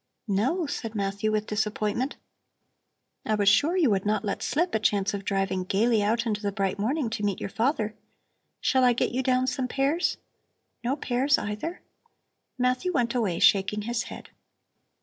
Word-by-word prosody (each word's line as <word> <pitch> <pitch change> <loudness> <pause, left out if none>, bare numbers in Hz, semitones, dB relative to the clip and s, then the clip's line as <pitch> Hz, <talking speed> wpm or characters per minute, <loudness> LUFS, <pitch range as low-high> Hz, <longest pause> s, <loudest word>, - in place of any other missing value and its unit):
"No?" 255 - +1
said 225 -6 -5
Matthew 200 +1 -1
with 215 0 0
disappointment. 215 +4 -1 1.1
"I 215 - 0
was 205 -1 0
sure 290 - +4
you 305 -10 +4
would 195 -1 +1
not 210 +1 0
let 200 - -2
slip 345 +4 0
a - - +2
chance 205 -1 +1
of 200 -1 -4
driving 195 -1 -1
gaily 215 +4 +2
out 230 +3 +1
into 210 -2 -1
the 205 -1 -1
bright 195 -1 -1
morning 260 +6 0
to 215 -2 -3
meet 200 -2 0
your 200 - -5
father. 225 -3 0 0.7
Shall 260 -1 +2
I 250 -1 +5
get 240 - 0
you 250 +3 0
down 255 0 +2
some 260 0 -1
pears? 280 +7 0 0.7
No 250 +3 0
pears, 270 +1 +1
either?" 210 +12 -4 0.8
Matthew 255 +8 +1
went 245 -7 0
away, 215 -9 0
shaking 200 +2 +3
his 235 +1 -1
head. - - -10
220 Hz, 170 wpm, -27 LUFS, 205-255 Hz, 1.1 s, I